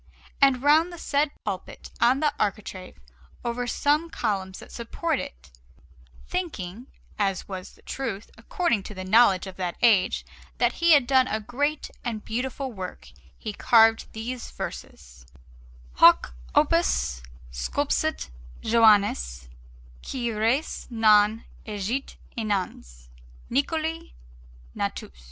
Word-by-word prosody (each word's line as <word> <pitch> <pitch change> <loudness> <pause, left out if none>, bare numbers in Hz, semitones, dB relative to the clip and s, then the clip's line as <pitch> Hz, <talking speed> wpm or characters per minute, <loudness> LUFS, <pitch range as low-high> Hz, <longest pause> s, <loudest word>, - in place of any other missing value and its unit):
And 270 -2 +4
round 315 +4 +5
the 345 - -9
said 290 -2 +1 0.2
pulpit, 190 -3 -6
on 255 +4 +4
the 300 -1 +2
architrave, 195 - -3 0.5
over 240 +1 -2
some 300 +6 +1
columns 195 -8 -2
that - - -12
support 290 +6 -2
it, 60 +3 -9 0.8
thinking 245 - -4 0.3
(as 195 -3 0
was 185 -2 -7
the - - -22
truth, 225 -7 -5
according 235 - -1
to 210 - -9
the 185 - -6
knowledge 200 -2 +5
of 190 -1 -9
that 180 -2 -3
age) 220 -6 +3 0.3
that - - +2
he 340 -1 +6
had 285 -4 +5
done 260 0 +4
a 215 - -1
great 285 +7 -2
and 225 -3 -4
beautiful 255 +2 -3
work, 185 -3 -8 0.3
he 215 - -5
carved 225 +1 +4
these 235 +2 -5
verses: 60 +1 -8 0.7
HOC - - +6 0.2
OPUS - - +2 0.3
SCULPSIT 285 - -1 0.3
JOANNES, 200 - +3 0.5
QUI 240 -3 -3
RES 225 +8 0
NON 215 -1 +4 0.2
EGIT 215 +6 -3 0.2
INANES, 185 - -3 0.4
NICOLI 320 +4 -1 0.6
NATUS - - -4
225 Hz, 120 wpm, -25 LUFS, 190-270 Hz, 0.8 s, he